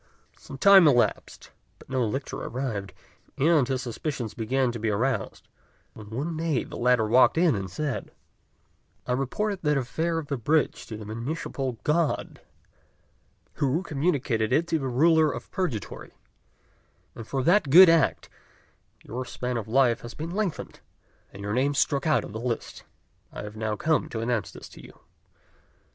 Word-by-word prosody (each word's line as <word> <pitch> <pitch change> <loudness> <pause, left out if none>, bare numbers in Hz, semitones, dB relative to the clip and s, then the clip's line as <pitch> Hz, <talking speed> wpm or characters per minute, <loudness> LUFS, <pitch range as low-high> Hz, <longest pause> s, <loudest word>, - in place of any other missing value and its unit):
Some 135 - -11
time 195 +2 +7
elapsed, 125 -5 0 0.3
but - - -18
no 130 -1 0
lictor 130 +5 -3
arrived; 115 -7 -4 0.5
and 150 -2 +3
his 130 -2 -2
suspicions 120 -1 -4
began 125 +3 0
to 120 - -6
be 110 0 -1
aroused, 125 +6 -2 0.5
when 105 -1 -12
one 145 +9 -3
day 160 -4 -1
the - - -10
latter 125 -2 +2
walked 125 +7 +4
in 170 -3 +4
and 95 -2 -4
said, 140 +8 -4 1.0
"I - - -3
reported 185 +11 -1
that 150 -2 +1
affair 160 +6 -1
of 165 - -3
the 140 -1 -3
bridge 150 +7 0
to 110 - -7
the 105 - -9
Municipal 130 +3 -4
God, 155 0 -1 1.2
who 145 +6 +1
communicated 135 - -1
it 155 +6 +3
to 160 - +1
the 135 - -3
Ruler 155 +4 +3
of 120 +1 -8
Purgatory; 135 - -4 1.0
and 115 - -10
for 135 -2 -2
that 175 0 +3
good 180 +6 +10
act 165 -1 +2 0.8
your 125 +4 -5
span 125 0 -4
of 115 -3 -4
life 120 0 +2
has 120 - -9
been 160 +2 -5
lengthened, 195 -3 -3 0.5
and 100 - -10
your 105 +1 -3
name 140 +4 +1
struck 140 0 +1
out 155 - +2
of - - -9
the 110 - -5
list. 120 -1 -4 0.5
I - - -7
have 105 0 -8
now 110 -1 -2
come 155 +8 0
to 115 - -5
announce 115 -2 -1
this - - -11
to - - -14
you." - - -15
130 Hz, 165 wpm, -26 LUFS, 115-155 Hz, 1.2 s, good